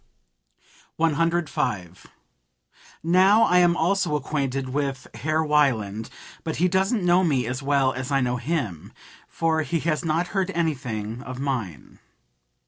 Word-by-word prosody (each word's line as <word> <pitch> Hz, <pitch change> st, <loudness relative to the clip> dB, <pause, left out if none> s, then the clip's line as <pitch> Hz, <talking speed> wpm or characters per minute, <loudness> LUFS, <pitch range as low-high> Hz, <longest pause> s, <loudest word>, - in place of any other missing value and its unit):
105. 160 Hz, -, -1 dB, 1.0 s
"Now 190 Hz, +6 st, +5 dB
I 180 Hz, -5 st, +4 dB
am 175 Hz, -1 st, +4 dB
also 175 Hz, -2 st, +1 dB
acquainted 135 Hz, -2 st, -2 dB
with 135 Hz, -1 st, -2 dB
Herr 155 Hz, +8 st, 0 dB
Wieland; 115 Hz, -8 st, +1 dB, 0.3 s
but 160 Hz, -, -3 dB
he 180 Hz, -, +2 dB
doesn't 190 Hz, +2 st, +1 dB
know 180 Hz, +1 st, +4 dB
me 135 Hz, -8 st, +1 dB
as 125 Hz, +4 st, -3 dB
well 135 Hz, -1 st, +2 dB
as 130 Hz, +2 st, -5 dB
I 135 Hz, -, +3 dB
know 125 Hz, -1 st, 0 dB
him, 120 Hz, -, -3 dB, 0.3 s
for 160 Hz, -1 st, 0 dB
he 160 Hz, +3 st, -1 dB
has 155 Hz, 0 st, -1 dB
not 165 Hz, +2 st, 0 dB
heard 195 Hz, -2 st, -1 dB
anything 125 Hz, -9 st, -2 dB
of 130 Hz, 0 st, -7 dB
mine. 120 Hz, -, -4 dB
150 Hz, 135 wpm, -24 LUFS, 125-170 Hz, 1.0 s, Now